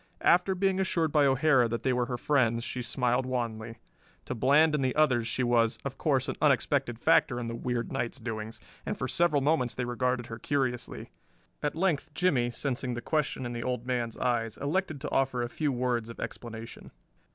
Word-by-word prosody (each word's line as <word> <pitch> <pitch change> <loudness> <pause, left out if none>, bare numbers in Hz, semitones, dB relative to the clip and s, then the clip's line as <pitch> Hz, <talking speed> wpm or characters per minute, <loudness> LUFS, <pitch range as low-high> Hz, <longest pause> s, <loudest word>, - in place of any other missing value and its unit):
After 180 +2 +4
being 190 0 +1
assured 165 -4 +1
by 145 -2 +4
O'Hara 135 -2 +4
that 115 0 -3
they 130 - +2
were 125 -1 0
her 125 -2 -3
friends 120 -4 +1
she 125 - -4
smiled 125 +1 0
wanly. 115 -2 -3 0.5
To - - -3
Bland 145 +6 +4
and 150 -3 +1
the 130 -1 0
others 130 -7 +3
she 125 +2 -1
was, 115 -2 +2
of 140 - -5
course, 135 -3 +1
an 130 - -3
unexpected 135 -3 +2
factor 120 +1 +3
in 120 - -4
the 115 - -4
weird 120 0 -3
night's 120 +3 -3
doings, 110 -1 -5 0.2
and - - -3
for - - -2
several 155 -5 +2
moments 140 -5 +1
they 125 - -2
regarded 125 0 -1
her 115 0 -8
curiously. 130 -2 -2 0.5
At 150 - -1
length 160 -4 0
Jimmie, 140 -10 +2
sensing 125 0 -3
the 120 - -4
question 150 -4 -1
in 120 - -4
the 120 - -4
Old 125 -1 -3
Man's 120 -3 -2
eyes, 115 -3 -1
elected 155 +1 -1
to 150 - -4
offer 130 -2 +1
a - - -2
few 150 +3 -1
words 120 -2 -1
of 115 - -10
explanation. 115 -1 -7
125 Hz, 195 wpm, -29 LUFS, 120-145 Hz, 0.5 s, After